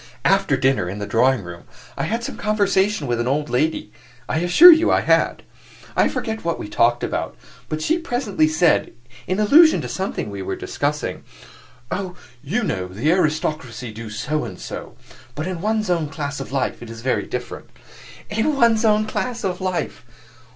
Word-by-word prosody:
After 195 -6 +3
dinner, 130 -9 +1
in 100 - -5
the 105 - -4
drawing 120 +2 +2
room, 85 -1 -10 0.3
I - - -2
had 230 +2 -2
some - - -5
conversation 205 -4 +1
with 120 -2 -1
an 120 - -1
old 150 +3 -1
lady; 125 -5 0 0.4
I 155 - 0
assure 175 - +9
you 330 +1 +4
I - - +3
had. - - +2 0.5
I - - +4
forget 220 0 -4
what 170 0 -1
we - - -6
talked 120 +3 +2
about, - - -3 0.3
but 155 0 -3
she 325 +3 +1
presently 245 - 0
said, 160 +2 +2 0.3
in 185 +3 -1
allusion 305 +10 +6
to - - -5
something 190 - -4
we 100 -1 -6
were 95 - -3
discussing, - - -3 0.7
'Oh, 185 -2 -3 0.3
you 200 - -1
know, 95 - -2
the 110 - 0
aristocracy 155 - -1
do 110 +1 -8
so 150 +8 -2
and - - -7
so; - - -8 0.4
but 155 - -3
in 180 -2 -4
one's 215 +1 0
own 165 -4 0
class 145 0 -4
of 135 - -7
life 135 -1 -2
it 120 - -9
is 115 0 -9
very 130 +1 -1
different.' - - -6 0.6
In 220 +8 0
one's 235 -4 +3
own 215 -1 +3
class 240 +2 -3
of 185 -1 -2
life! 185 -9 -3
160 Hz, 180 wpm, -21 LUFS, 125-210 Hz, 0.7 s, assure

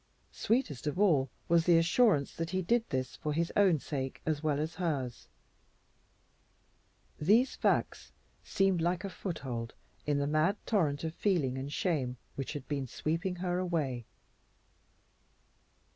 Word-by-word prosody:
Sweetest 220 - -1
of 150 +5 -2
all 150 -10 +4 0.2
was 170 0 +3
the 170 -1 +7
assurance 165 - +3
that 165 0 -3
he 185 +1 -1
did 235 +6 +2
this 130 -1 -2
for 150 -2 -2
his 165 +2 -1
own 190 -5 +5
sake 135 -2 -4
as 155 -2 0
well 150 -2 0
as 155 +2 -2
hers. 135 -8 -2 1.9
These 215 - +4
facts - - 0 0.3
seemed 195 -3 +1
like 175 +2 0
a 195 - -4
foothold 130 - -5 0.3
in 145 -1 +2
the 140 - +1
mad 155 +7 +2
torrent 155 -10 +1
of 160 -1 -3
feeling 170 -10 +1
and 135 +2 -5
shame 140 -8 -1 0.2
which 135 +1 -4
had 145 -3 -7
been 140 -3 -2
sweeping 165 - -2
her 180 0 -1
away. 150 -10 -2
160 Hz, 145 wpm, -31 LUFS, 140-180 Hz, 1.9 s, the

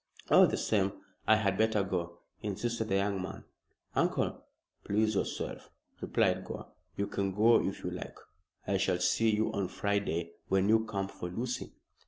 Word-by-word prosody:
"All - - +8
the - - -1
same 100 -2 +1 0.3
I 110 - +7
had 105 -3 +1
better 110 -2 +3
go," 85 -2 -3 0.2
insisted 110 +3 -2
the 95 - +2
young 100 0 +1
man. 95 - -6 0.5
"Uncle?" - - 0 0.4
"Please 110 +2 +1
yourself," 100 - -3 0.3
replied - - +1
Gore. - - -7 0.3
"You 100 - +1
can 100 -1 -1
go 115 +3 +6
if - - -3
you - - -2
like. - - -7 0.5
I 100 +1 +1
shall 95 -1 +1
see 110 +5 +2
you 110 0 +1
on 100 -3 0
Friday 95 -4 -1 0.2
when 95 +1 +2
you 110 0 +4
come 100 -3 -2
for 90 -2 -6
Lucy." 120 +7 -4
100 Hz, 165 wpm, -31 LUFS, 95-110 Hz, 0.5 s, All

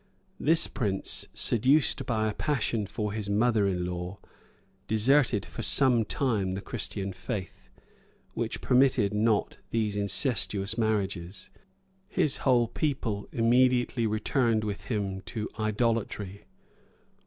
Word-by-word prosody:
This 160 +3 +4
prince, 100 -6 -2
seduced 130 +6 +3
by 110 -2 0
a 105 - -1
passion 115 -8 -1
for 105 0 -3
his 105 -2 -4
mother 110 0 +2
in 90 -2 -1
law, 90 +2 -5 0.7
deserted, 115 0 +3
for - - -7
some 125 -5 +4
time, 105 -8 -1
the 95 - -4
Christian 100 -3 -4
faith, 95 +1 -6 0.6
which - - -3
permitted 125 -5 +3
not 105 0 +1
these 110 -3 -1
incestuous 100 -1 0
marriages: 100 -5 -2 0.6
his 150 - +1
whole 120 -3 +3
people 115 -7 -2
immediately 120 0 +2
returned 110 +1 +1
with 105 -2 -4
him 100 -4 -2
to 110 -2 -4
idolatry. 110 -2 -1
110 Hz, 115 wpm, -28 LUFS, 100-120 Hz, 0.7 s, This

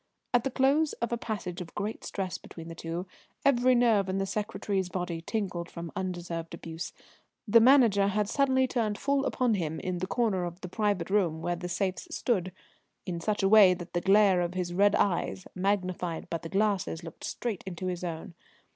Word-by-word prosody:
At 245 -1 +4
the 270 - 0
close 280 +4 +2
of 235 - -3
a - - +2
passage 200 -6 -4
of 165 - -9
great 210 +2 -4
stress 190 -2 -4
between 165 -1 -10
the - - -6
two, 165 +2 -5 0.4
every 255 -2 +4
nerve 225 -5 +3
in 190 - -1
the 195 - 0
secretary's 200 -2 -2
body 175 -3 -3
tingling 185 -3 -3
from 170 -1 -7
undeserved 175 -3 -4
abuse, 165 0 -6 0.6
the 230 +2 +7
Manager 230 -5 +6
had 205 +1 0
suddenly 260 +1 +2
turned 220 -5 -1
full 280 0 +1
upon 250 -3 +1
him, 160 -5 -2
in 180 -1 -3
the 185 - -2
corner 205 -4 +1
of 175 +1 -6
the 185 - -5
private 200 -3 -1
room 170 -6 +1
where 175 0 0
the 180 +1 -6
safes 185 +1 -2
stood, 185 -7 -1 0.5
in 175 -2 -3
such 205 +4 -1
a - - +5
way 195 -3 +7
that 175 0 -9
the 175 - 0
glare 195 -1 +5
of 175 +1 -2
his 180 -1 -2
red 200 +2 +4
eyes, 190 0 0
magnified 185 -3 -1
by 165 - -1
the 165 - -8
glasses, 195 -4 0
looked 165 -2 -10
straight 225 -6 -3
into 185 0 -5
his 180 -1 -3
own. 170 0 -5
190 Hz, 195 wpm, -29 LUFS, 175-215 Hz, 0.6 s, the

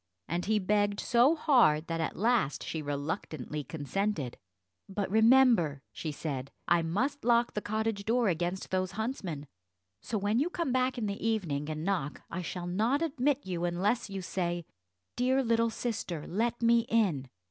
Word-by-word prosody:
And 175 +2 -2
he 215 +1 +2
begged 205 +1 +1
so 245 +7 +4
hard 235 - +4
that 165 -1 -2
at 160 - -2
last 220 - +1
she 160 - -4
reluctantly 145 0 -4
consented. 160 - -2 0.5
"But 195 0 -2
remember," 220 - +5
she 155 - -4
said, 140 -3 -4 0.2
"I 175 0 +4
must 210 - -1
lock 235 0 +3
the 210 - -2
cottage 215 -1 -2
door 235 +2 +2
against 175 +1 -1
those 185 0 0
huntsmen, 195 - -3 0.6
so 220 - -2
when 205 +3 +1
you 305 +6 +1
come 340 -6 -2
back 255 0 +1
in 230 - -1
the 200 -1 -4
evening, 170 -10 -1
and 155 +1 -4
knock, 175 -8 -2
I 180 - -3
shall 175 0 -5
not 225 - +1
admit 285 -2 0
you, 175 -2 -3
unless 195 +7 0
you 195 -1 -5
say, 175 -2 -2 0.5
'Dear 260 +2 +2
little 230 -1 +2
sister 215 -9 -3
let 235 +5 -1
me 230 0 +4
in.'" 175 - +1
200 Hz, 165 wpm, -30 LUFS, 165-235 Hz, 0.6 s, remember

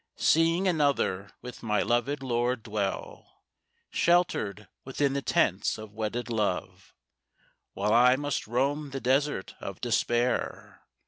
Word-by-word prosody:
Seeing 165 +4 +3
another 140 - +1
with 125 -1 -9
my 105 -3 +1
loved 135 +4 0
lord 120 -1 0
dwell 105 -4 -5 0.5
Sheltered 110 - +1 0.2
within 135 +1 0
the 140 - -1
tents - - +1
of 110 -1 -10
wedded 110 +3 -3
love 95 -5 -3 0.8
While 105 +3 0
I 125 +2 +6
must 145 -3 -3
roam 140 +5 0
the 135 0 -5
desert 135 -4 0
of 100 -2 -7
Despair? 120 0 -1
120 Hz, 120 wpm, -28 LUFS, 105-140 Hz, 0.8 s, I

